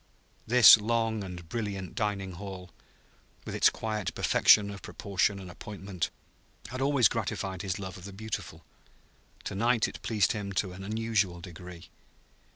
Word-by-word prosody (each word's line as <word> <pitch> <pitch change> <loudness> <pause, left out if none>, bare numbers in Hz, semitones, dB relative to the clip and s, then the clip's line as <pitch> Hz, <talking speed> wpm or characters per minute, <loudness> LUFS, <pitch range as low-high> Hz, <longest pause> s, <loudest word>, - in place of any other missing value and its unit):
This 120 -1 +9
long 110 -1 -1
and 90 -3 -8
brilliant 100 -2 -4
dining 100 -3 -2
hall, 90 -1 -8 0.7
with - - -6
its - - +5
quiet 110 -3 -4
perfection 100 -1 +5
of 100 -2 -9
proportion 100 0 -1
and 95 -2 -9
appointment, 95 -1 -5 0.6
had 130 +1 -5
always 135 -4 +4
gratified 95 -2 -3
his 95 -2 -3
love 95 -1 -7
of 90 - -12
the 100 - -8
beautiful; 110 +2 -6 0.8
to - - -5
night 115 +3 +2
it - - -9
pleased 105 -4 +1
him 100 -4 -4
to 95 0 -1
an 95 +1 -9
unusual 105 -4 0
degree. 90 -1 -11
100 Hz, 150 wpm, -29 LUFS, 95-110 Hz, 0.8 s, This